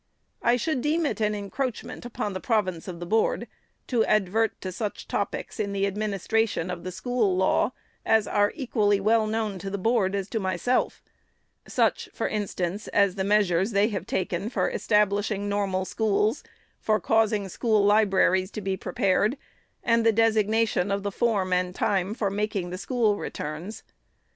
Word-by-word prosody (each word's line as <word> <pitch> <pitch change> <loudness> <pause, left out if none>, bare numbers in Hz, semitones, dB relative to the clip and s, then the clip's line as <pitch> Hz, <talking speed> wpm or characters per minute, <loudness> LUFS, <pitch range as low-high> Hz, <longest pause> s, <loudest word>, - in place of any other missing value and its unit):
I 240 +1 +3
should 270 0 -1
deem 315 +4 +1
it 260 - -2
an 210 0 +1
encroachment 240 +4 -4
upon 210 -4 -3
the 185 - -4
province 185 -7 -1
of 175 -2 -6
the 175 - -5
Board 220 +5 +1 0.4
to 235 -3 +2
advert 215 +2 +1
to 185 - -4
such 205 +3 -5
topics - - -3
in 200 -1 -1
the 195 0 +1
administration 205 -1 -1
of 175 -1 -6
the 185 - -5
school 200 0 0
law, 190 +4 +2 0.3
as 220 -1 +3
are 205 0 +2
equally 215 -7 +1
as 195 - -6
well 220 +1 +3
known 215 -3 -2
to 195 - -5
the 200 - -3
Board 200 -1 +1
as 195 -1 -2
to 225 - -1
myself; 200 +6 0 0.3
— - - -32
such, - - +2
for - - -1
instance, 200 -1 -3
as 200 -2 +3
the 190 0 -2
measures 200 0 +2
they 200 +2 +3
have 200 -3 -4
taken 185 +2 -2
for - - 0
establishing 205 -1 +1
Normal 195 -2 -1
Schools, 215 +4 0 0.4
for 215 0 +1
caus 220 +2 +2
ing 205 -2 -1
school 215 +1 +1
libraries 195 -3 +3
to 215 - -6
be 195 -1 -1
prepared, 200 +6 +1 0.5
and 230 -1 +3
the 225 - +5
designation 220 -2 +2
of 200 0 -1
the 200 - -2
form 195 -4 0
and 180 0 0
time 195 +1 0
for 205 -5 -1
making 200 -3 -2
the 185 - -5
School 225 -3 +1
Returns. 160 +8 -6
205 Hz, 175 wpm, -26 LUFS, 190-220 Hz, 0.5 s, the